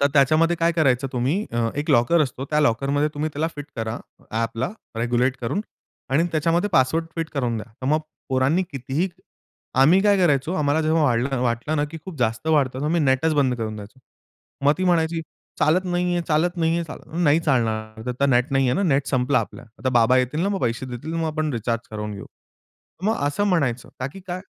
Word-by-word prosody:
तर 140 Hz, -, +5 dB
त्याच्यामध्ये 155 Hz, +4 st, +4 dB
काय 170 Hz, +1 st, +2 dB
करायचं 135 Hz, -5 st, +2 dB
तुम्ही 135 Hz, -, 0 dB
अ, 115 Hz, -1 st, +1 dB
एक 145 Hz, +1 st, -1 dB
लॉकर 120 Hz, +8 st, +4 dB
असतो 135 Hz, -1 st, -4 dB
त्या 150 Hz, 0 st, +3 dB
लॉकरमध्ये 140 Hz, +3 st, +1 dB
तुम्ही 155 Hz, +2 st, -2 dB
त्याला 155 Hz, +3 st, -1 dB
फिट 145 Hz, -, -5 dB
करा 115 Hz, 0 st, -3 dB, 0.4 s
ॲपला 115 Hz, +3 st, -1 dB, 0.3 s
रेग्युलेट 120 Hz, +3 st, +1 dB
करून 125 Hz, -, -1 dB, 0.5 s
आणि 145 Hz, +5 st, +3 dB
त्याच्यामध्ये 165 Hz, +5 st, +1 dB
पासवर्ड 155 Hz, +4 st, +3 dB
फिट 165 Hz, -1 st, -2 dB
करून 125 Hz, -5 st, 0 dB
द्या. 105 Hz, 0 st, -6 dB
तर 130 Hz, -, -4 dB
मग 155 Hz, +2 st, +2 dB, 0.3 s
पोरांनी 135 Hz, +7 st, +2 dB
कितीही 135 Hz, +7 st, -2 dB, 0.7 s
आम्ही 170 Hz, +8 st, +6 dB
काय 205 Hz, -1 st, +4 dB
करायचो 155 Hz, -3 st, +2 dB
आम्हाला 150 Hz, -2 st, +1 dB
जेव्हा 140 Hz, -5 st, +2 dB
वाटलं 120 Hz, +6 st, -1 dB
ना, 145 Hz, -, +2 dB
की 150 Hz, +2 st, -8 dB
खूप 185 Hz, -4 st, -8 dB
जास्त 115 Hz, +2 st, -1 dB
वाढतं, 145 Hz, -5 st, +3 dB
तेव्हा 145 Hz, +3 st, -1 dB
मी 175 Hz, -, +2 dB
नेटच 135 Hz, +4 st, +2 dB
बंद 135 Hz, -4 st, +2 dB
करून 110 Hz, -2 st, -4 dB
द्यायचो. 105 Hz, +5 st, -11 dB, 0.7 s
मग 145 Hz, -, +6 dB
ती 185 Hz, -, 0 dB
म्हणायची, 165 Hz, -2 st, +2 dB, 0.4 s
"चालत 175 Hz, +5 st, +3 dB
नाहीये, 175 Hz, -1 st, 0 dB
चालत 170 Hz, +3 st, +1 dB
नाहीये, 165 Hz, 0 st, +1 dB
चाल 155 Hz, -, -8 dB, 0.3 s
नाही 150 Hz, +2 st, +4 dB
चालणार, 110 Hz, -5 st, -1 dB
आता 125 Hz, +3 st, 0 dB
नेट 125 Hz, 0 st, +2 dB
नाहीये 135 Hz, -2 st, +3 dB
ना, 195 Hz, -, +1 dB
नेट 145 Hz, -6 st, +2 dB
संपला 130 Hz, +1 st, +2 dB
आपला -, -, -5 dB, 0.2 s
आता 130 Hz, -, -1 dB
बाबा 120 Hz, +2 st, +4 dB
येतील 130 Hz, +5 st, 0 dB
ना, 195 Hz, -, +1 dB
मग 200 Hz, -1 st, -2 dB
पैसे 120 Hz, +1 st, -1 dB
देतील 130 Hz, +6 st, -6 dB
मग 165 Hz, -1 st, -1 dB
आपण 155 Hz, -1 st, -1 dB
रिचार्ज 115 Hz, 0 st, -2 dB
करवून 105 Hz, -1 st, -4 dB
घेऊ." 100 Hz, -, -8 dB, 0.8 s
मग 220 Hz, -, +2 dB
असं 170 Hz, +8 st, 0 dB
म्हणायचं 140 Hz, -, 0 dB
का, 130 Hz, -, -1 dB
की 195 Hz, -, -10 dB
काय 180 Hz, 0 st, -4 dB
140 Hz, 195 wpm, -23 LUFS, 125-165 Hz, 0.8 s, आम्ही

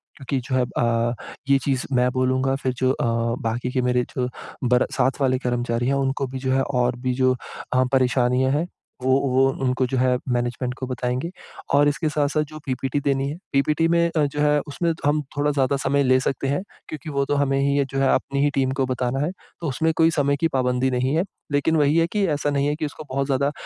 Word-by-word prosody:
क्योंकि 135 Hz, 0 st, -3 dB
जो 130 Hz, -, -1 dB
है 130 Hz, -, +3 dB, 0.2 s
अ, 115 Hz, 0 st, +1 dB, 0.4 s
ये 140 Hz, -, +6 dB
चीज़ 135 Hz, -3 st, 0 dB
मैं 125 Hz, 0 st, +3 dB
बोलूँगा 130 Hz, +1 st, +1 dB
फिर 130 Hz, -, 0 dB
जो 130 Hz, 0 st, +2 dB
अ, 125 Hz, -, -1 dB, 0.4 s
बाकी 120 Hz, +2 st, -2 dB
के 130 Hz, 0 st, 0 dB
मेरे 125 Hz, 0 st, +2 dB
जो 125 Hz, -2 st, 0 dB, 0.4 s
बर 125 Hz, 0 st, +4 dB
साथ 130 Hz, 0 st, 0 dB
वाले 130 Hz, -1 st, +3 dB
कर्मचारी 120 Hz, -1 st, -1 dB
हैं 140 Hz, -, +2 dB
उनको 135 Hz, 0 st, 0 dB
भी 130 Hz, +1 st, -6 dB
जो 130 Hz, 0 st, -1 dB
है 135 Hz, 0 st, +3 dB
और 125 Hz, -2 st, 0 dB
भी 125 Hz, -, +2 dB
जो 130 Hz, 0 st, +3 dB, 0.4 s
अ, 130 Hz, 0 st, +4 dB
परेशानियाँ 130 Hz, 0 st, +2 dB
हैं 155 Hz, +5 st, 0 dB, 0.4 s
वो 130 Hz, 0 st, +3 dB, 0.2 s
वो 130 Hz, +1 st, +4 dB, 0.2 s
उनको 130 Hz, 0 st, +1 dB
जो 130 Hz, -, -2 dB
है 125 Hz, 0 st, +3 dB
मैनेजमेंट 125 Hz, +1 st, -1 dB
को 130 Hz, -, -4 dB
बताएँगे। 125 Hz, +4 st, -2 dB, 0.4 s
और 145 Hz, +1 st, +5 dB
इसके 155 Hz, +2 st, 0 dB
साथ-साथ 150 Hz, 0 st, +1 dB
जो 155 Hz, -, -9 dB
पीपीटी 135 Hz, +1 st, -1 dB
देनी 135 Hz, -1 st, 0 dB
है, 150 Hz, -, -5 dB, 0.2 s
पीपीटी 150 Hz, +4 st, +2 dB
में 170 Hz, 0 st, +3 dB
अ, 150 Hz, -, +4 dB
जो 145 Hz, +1 st, -4 dB
है 150 Hz, 0 st, +3 dB
उसमें 170 Hz, +4 st, -1 dB
हम 150 Hz, +1 st, +2 dB, 0.2 s
थोड़ा 145 Hz, +1 st, +2 dB
ज़्यादा 140 Hz, -1 st, +1 dB
समय 140 Hz, +1 st, +2 dB
ले 130 Hz, 0 st, +4 dB
सकते 135 Hz, +1 st, -2 dB
हैं 145 Hz, +6 st, 0 dB, 0.3 s
क्योंकि 155 Hz, +1 st, -7 dB
वो 140 Hz, -1 st, 0 dB
तो 145 Hz, -, 0 dB
हमें 135 Hz, -1 st, +1 dB
ही 140 Hz, +1 st, +2 dB
ये 140 Hz, -, +2 dB
जो 135 Hz, -, -1 dB
है 135 Hz, -, +3 dB
अपनी 140 Hz, +1 st, 0 dB
ही 145 Hz, -, +4 dB
टीम 130 Hz, -1 st, +1 dB
को -, -, +3 dB
बताना 130 Hz, 0 st, -1 dB
है, 170 Hz, -, -2 dB, 0.3 s
तो 165 Hz, -, -2 dB
उसमें 160 Hz, +5 st, +1 dB
कोई 165 Hz, 0 st, +5 dB
समय 140 Hz, -2 st, +1 dB
की 165 Hz, -, +4 dB
पाबंदी 125 Hz, 0 st, +1 dB
नहीं 130 Hz, +3 st, 0 dB
है। 165 Hz, -, +2 dB, 0.3 s
लेकिन 145 Hz, +3 st, +2 dB
वही 150 Hz, +1 st, +3 dB
है 165 Hz, 0 st, +3 dB
कि 205 Hz, +2 st, 0 dB
ऐसा 145 Hz, -, -1 dB
नहीं 140 Hz, 0 st, +1 dB
है 150 Hz, -, 0 dB
कि 155 Hz, -, -3 dB
उसको 150 Hz, +1 st, -7 dB
बहुत 135 Hz, +1 st, 0 dB
ज़्यादा 140 Hz, +1 st, +1 dB
135 Hz, 230 wpm, -23 LUFS, 125-145 Hz, 0.4 s, ये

